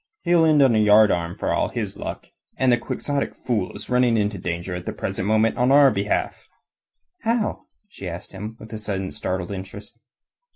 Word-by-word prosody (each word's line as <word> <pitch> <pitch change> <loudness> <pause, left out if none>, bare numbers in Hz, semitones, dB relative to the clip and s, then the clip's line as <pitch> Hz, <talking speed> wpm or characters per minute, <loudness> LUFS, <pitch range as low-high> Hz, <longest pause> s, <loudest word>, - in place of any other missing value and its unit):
He'll 170 -2 +4
end 150 -3 +5
on 130 -3 +4
a - - +3
yardarm 105 -5 +4
for - - -1
all - - +1
his - - -4
luck. - - -6 0.3
And 130 -1 +3
the 120 - +4
quixotic 140 +4 -3
fool 110 -7 -2
is - - -7
running 125 -2 +3
into 105 -2 -1
danger 85 +1 -4
at 90 0 -6
the - - -2
present 95 - -3
moment 110 +1 +2
on 125 +2 +3
our 140 -1 +7
behalf." 100 -1 -2 0.7
"How?" 230 -1 -1 0.2
she 100 - -8
asked 85 +1 -8
him 105 +3 -7
with 110 +1 -11
a 110 - -5
sudden 95 -3 -3
startled 90 -1 -3
interest. 100 +4 -8
110 Hz, 190 wpm, -23 LUFS, 95-125 Hz, 0.7 s, our